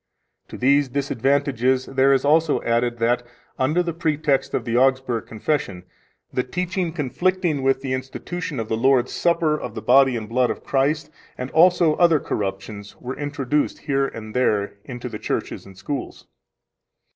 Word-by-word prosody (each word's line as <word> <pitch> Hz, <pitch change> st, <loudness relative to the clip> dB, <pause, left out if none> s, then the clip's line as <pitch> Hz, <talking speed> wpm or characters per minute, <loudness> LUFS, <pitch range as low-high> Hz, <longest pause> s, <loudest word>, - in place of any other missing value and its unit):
To -, -, -9 dB
these 140 Hz, +2 st, +3 dB
disadvantages 130 Hz, -1 st, +1 dB
there 135 Hz, 0 st, +2 dB
is 135 Hz, 0 st, +2 dB
also 155 Hz, +1 st, +3 dB
added 120 Hz, +1 st, 0 dB
that, 120 Hz, +2 st, +1 dB, 0.4 s
under 155 Hz, +7 st, +2 dB
the 170 Hz, -1 st, -3 dB
pretext 155 Hz, -4 st, 0 dB
of -, -, -2 dB
the 115 Hz, -1 st, -1 dB
Augsburg 130 Hz, -2 st, +1 dB
Confession, 110 Hz, -6 st, -2 dB, 0.5 s
the 125 Hz, -, +1 dB
teaching 180 Hz, +5 st, -2 dB
conflicting 170 Hz, +1 st, 0 dB
with 135 Hz, 0 st, +1 dB
the 130 Hz, -1 st, -2 dB
institution 135 Hz, +4 st, -5 dB
of 110 Hz, -, -3 dB
the 110 Hz, 0 st, -2 dB
Holy 130 Hz, 0 st, +4 dB
Supper 165 Hz, -1 st, +1 dB
of -, -, -6 dB
the -, -, -5 dB
body 135 Hz, 0 st, +5 dB
and 110 Hz, -2 st, -6 dB
blood 125 Hz, +2 st, +1 dB
of -, -, -4 dB
Christ 150 Hz, +3 st, 0 dB, 0.3 s
and 125 Hz, +1 st, -5 dB
also 170 Hz, -1 st, +5 dB
other 170 Hz, -3 st, +5 dB
corruptions 100 Hz, -1 st, -5 dB
were 130 Hz, +1 st, -5 dB
introduced 145 Hz, 0 st, -1 dB
here 135 Hz, -2 st, 0 dB
and 110 Hz, -3 st, -9 dB
there 105 Hz, -5 st, +1 dB
into 125 Hz, -1 st, -6 dB
the 110 Hz, -3 st, -7 dB
churches -, -, -4 dB
and 95 Hz, -1 st, -14 dB
schools. 140 Hz, +3 st, -5 dB
135 Hz, 160 wpm, -22 LUFS, 120-150 Hz, 0.5 s, body